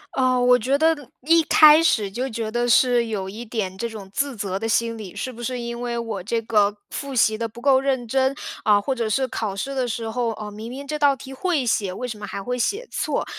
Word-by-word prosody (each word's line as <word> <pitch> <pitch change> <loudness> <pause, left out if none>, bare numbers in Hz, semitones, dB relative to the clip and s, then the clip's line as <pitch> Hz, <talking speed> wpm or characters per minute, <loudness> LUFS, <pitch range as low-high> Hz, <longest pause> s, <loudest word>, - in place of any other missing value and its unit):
呃， 255 -1 +2
我 250 0 +5
觉 270 +5 +1
得 320 +1 +3 0.3
一 330 +4 +4
开 305 +1 +7
始 210 -11 +2
就 255 +5 -3
觉 225 -1 -4
得 240 +1 0
是 240 0 +4
有 195 -4 -3
一 215 +5 -7
点 215 -5 -3
这 230 +4 -3
种 210 -3 -9
自 275 -2 -1
责 195 -1 -3
的 225 - -3
心 230 +1 +1
理。 205 -3 -9
是 255 +6 -4
不 235 - -10
是 250 +1 -3
因 235 0 -5
为 240 -1 -2
我 225 -5 -4
这 230 +5 -1
个 210 -2 +2
复 275 -2 -5
习 220 -2 +3
得 230 +1 -2
不 225 +2 -13
够 265 0 +4
认 260 -4 -1
真？ 265 +3 +1 0.3
啊， 210 -2 +5
或 265 +6 -1
者 230 -3 -2
是 265 +4 +1
考 210 -5 -3
试 275 +8 -4
的 255 -2 -1
时 225 -1 -3
候， 235 +1 -1
呃， 210 -1 -7
明 220 +2 -8
明 275 +3 -7
这 300 +1 -4
道 285 -2 +4
题 270 +1 -10
会 305 -3 0
写， 205 -4 0
为 250 +7 -5
什 220 -3 -6
么 205 - -6
还 200 - -5
会 250 +2 -3
写 425 - -1
错？ - - -1
235 Hz, 270 characters per minute, -23 LUFS, 215-265 Hz, 0.3 s, 开